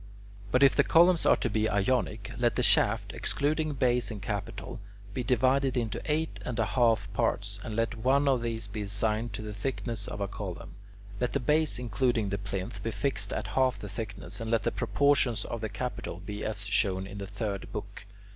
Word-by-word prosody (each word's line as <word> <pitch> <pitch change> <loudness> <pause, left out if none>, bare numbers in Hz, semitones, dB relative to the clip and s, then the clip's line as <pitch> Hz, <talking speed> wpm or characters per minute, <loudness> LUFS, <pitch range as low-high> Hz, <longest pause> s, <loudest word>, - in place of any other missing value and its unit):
But 125 +5 +4
if 135 - +6
the - - +5
columns 170 +1 +5
are - - +7
to - - -1
be 110 0 +1
Ionic, 105 0 0
let 120 -1 +1
the - - +1
shaft, - - +3
excluding 155 +1 0
base 125 -2 +2
and 110 -3 -5
capital, 105 +2 -5 0.3
be 125 - -2
divided 130 +2 +2
into 115 -3 -1
eight 160 +1 -1
and 125 -1 -4
one 110 -4 +1
half 115 -4 +3
parts, 100 +1 0
and 110 - -5
let 115 +1 +1
one 130 +5 +2
of 130 -3 +3
these 115 -2 -2
be 105 +1 -5
assigned 105 +3 -1
to 110 - -5
the 105 -1 -5
thickness 115 0 -3
of - - -5
a 100 - -1
column. 95 -3 -6 0.5
Let 125 - 0
the 140 - +1
base, 150 +4 +2
including 120 -2 0
the 100 0 -2
plinth, 100 -1 -4
be 115 - -2
fixed 135 +5 -1
at - - -3
half 130 -4 +2
the 105 0 -7
thickness, 105 +1 -5
and 115 - -3
let 115 -3 +2
the - - +1
proportions 120 +1 +2
of 115 - -4
the 110 - -2
capital 115 -8 -4
be 105 +2 -6
as 105 -1 -3
shown 95 -2 +1
in 100 +1 -8
the 100 - -5
third 100 -1 -4
book. - - -7
115 Hz, 205 wpm, -29 LUFS, 100-125 Hz, 0.5 s, are